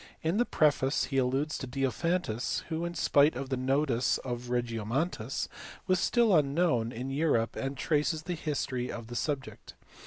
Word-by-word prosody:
In 165 +5 +1
the 240 - +3
preface 140 -3 +2
he 135 - -2
alludes 135 +4 0
to 130 - -5
Diophantus 135 0 -1
who, 165 +1 -2
in 170 0 -4
spite 145 -2 +4
of 130 +1 -4
the 135 - 0
notice 130 -1 +1
of 120 -1 -5
Regiomontanus, 120 +3 -1 0.4
was 185 -1 +2
still 225 0 +3
unknown 140 -5 +2
in 125 +3 -5
Europe, 135 -6 +1
and 135 0 -3
traces 155 +2 0
the 180 - -3
history 140 -6 -2
of 115 -1 -7
the 120 - -6
subject. 140 -1 -4
135 Hz, 160 wpm, -30 LUFS, 125-160 Hz, 0.4 s, spite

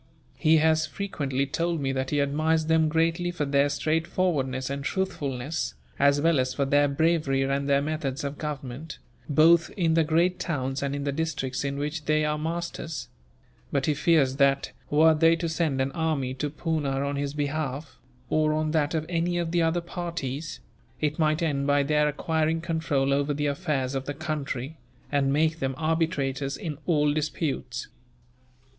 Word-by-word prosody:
He 160 +1 +5
has 160 0 +3
frequently 140 -9 -2
told 165 +4 -1
me 135 -1 -1
that 130 0 -2
he 145 - +1
admires 155 +3 +1
them 160 -1 +3
greatly 165 +2 +1
for 175 -4 -2
their 140 0 +3
straightforwardness 150 -3 0
and 140 0 -4
truthfulness, 155 -5 -2 0.2
as 140 0 +4
well 165 -1 +3
as 130 0 -1
for 140 - +1
their 145 +1 +4
bravery 145 -2 +1
and 140 +1 -1
their 140 0 +3
methods 145 -3 -3
of 140 0 -4
government, 150 0 -5 0.3
both 165 +3 +5
in 165 -4 +2
the 165 0 +4
great 170 +4 +2
towns 135 -5 -2
and 140 0 -1
in 140 - -3
the 140 - 0
districts 140 -4 -2
in 140 0 -2
which 150 +2 -3
they 155 0 +2
are 150 0 -1
masters; 160 -4 -4 0.6
but 140 -1 +1
he 150 - +2
fears 145 -3 +2
that, 140 -1 +2 0.2
were 160 +2 +5
they 165 +1 +4
to 170 0 -2
send 160 -4 0
an 135 +1 0
army 155 -6 -1
to 140 +3 -3
Poona 145 -3 -1
on 140 - -2
his 140 0 -3
behalf, 145 -1 -3 0.3
or 155 +3 +2
on 155 0 0
that 155 0 +1
of 155 -1 -1
any 175 0 0
of 170 -1 -1
the 175 0 +2
other 165 +1 +1
parties, 165 -4 -5 0.4
it 150 0 -1
might 155 +1 +2
end 140 -3 0
by 145 0 +3
their 150 +1 +2
acquiring 160 +2 0
control 160 -5 0
over 145 +1 +1
the 145 +1 -1
affairs 140 -3 -1
of 135 0 -3
the 145 - -4
country, 150 -2 -4 0.3
and 140 -1 +2
make 155 +3 +2
them 135 -1 -1
arbitrators 145 -4 -1
in 155 -4 -5
all 150 -4 +3
disputes." 150 -4 -2
150 Hz, 175 wpm, -26 LUFS, 140-160 Hz, 0.6 s, He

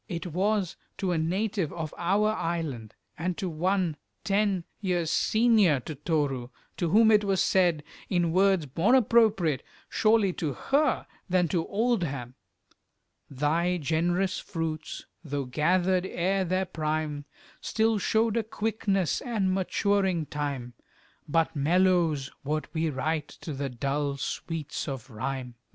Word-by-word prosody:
It 170 -2 -4
was 190 +2 0 0.2
to 190 -2 -1
a 175 - +1
native 190 +1 -1
of 160 -3 -5
our 200 +5 +2
island, 155 - -3 0.2
and 175 +1 -2
to 190 - -2
one 175 0 0 0.3
ten 200 -3 +1 0.2
years 175 -5 0
senior 215 - +4
to 155 - -6
Toru, 145 -4 -1 0.3
to 170 - 0
whom 220 +5 +6
it 210 -1 +5
was 195 -2 +1
said, 175 -6 +3 0.3
in 175 -3 +1
words 190 -2 +3
more 210 +10 +4
appropriate, 210 - +3 0.3
surely, 215 -4 +3
to 155 -5 -2
her 275 - +1 0.2
than 180 -1 +3
to 165 +1 0
Oldham, 175 - -1 1.0
Thy 160 +6 +1
generous 175 +4 0
fruits, 160 -3 -4 0.2
though 145 -3 -3
gathered 180 +7 +1
ere 190 +2 0
their 185 +2 0
prime, 155 -3 -2 0.4
Still 220 -1 +1
showed 220 +2 +1
a - - +3
quickness, 205 -4 -1
and 210 -7 0
maturing 190 -2 +1
time 140 -5 -4 0.6
But 165 +1 +1
mellows 165 -2 +2
what 150 +1 -3
we 160 0 0
write 150 +2 -1
to 155 - -5
the 140 0 -3
dull 140 +3 -2
sweets 155 +2 -4
of 135 -2 -6
Rime. 125 +2 -4
175 Hz, 135 wpm, -28 LUFS, 150-195 Hz, 1.0 s, whom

